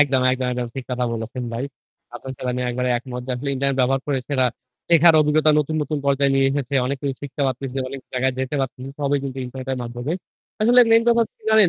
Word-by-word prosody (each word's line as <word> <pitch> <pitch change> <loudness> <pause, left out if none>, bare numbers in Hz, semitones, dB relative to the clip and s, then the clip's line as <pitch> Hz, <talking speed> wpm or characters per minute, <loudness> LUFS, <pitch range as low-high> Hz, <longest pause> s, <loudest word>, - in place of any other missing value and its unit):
একদম, 135 -3 +4
একদম, 130 0 -1
একদম, 125 0 -2
ঠিক 135 - -5
কথা 125 0 0
বলেছেন 115 +2 -4
ভাই। 120 +4 -2 0.5
আপনার 130 +2 -7
সাথে 125 - -5
আমি 125 +1 -2
একেবারে 125 +1 -1
একমত 125 0 -6
যে, - - -4
আসলে 140 +3 -3
ইন্টারনেট 140 0 0
ব্যবহার 135 +1 +2
করে 140 -2 0
সেটা 130 -3 +2 0.4
শেখার 170 -1 +6
অভিজ্ঞতা 155 +1 +4
নতুন, 150 +1 0
নতুন 150 0 -2
পর্যায়ে 140 0 +3
নিয়ে 135 0 +4
এসেছে। 140 -1 -2
অনেক 140 +2 -1
কিছু 140 -2 -1
শিখতে 140 0 -4
পারতেছি, 130 0 -3
অনেক 135 - -7
জায়গায় 130 +1 +1
যেতে 130 +2 -2
পারতেছি। 130 0 -4
সবই 145 0 +1
কিন্তু 135 -1 -5
ইন্টারনেটের 130 +1 -4
মাধ্যমে। 120 +5 -4 0.5
আসলে 240 +3 +6
মেইন 225 0 +6
ব্যাপার 235 -1 +4
কি - - -35
জানেন 215 -3 +7
135 Hz, 215 wpm, -22 LUFS, 125-145 Hz, 0.5 s, জানেন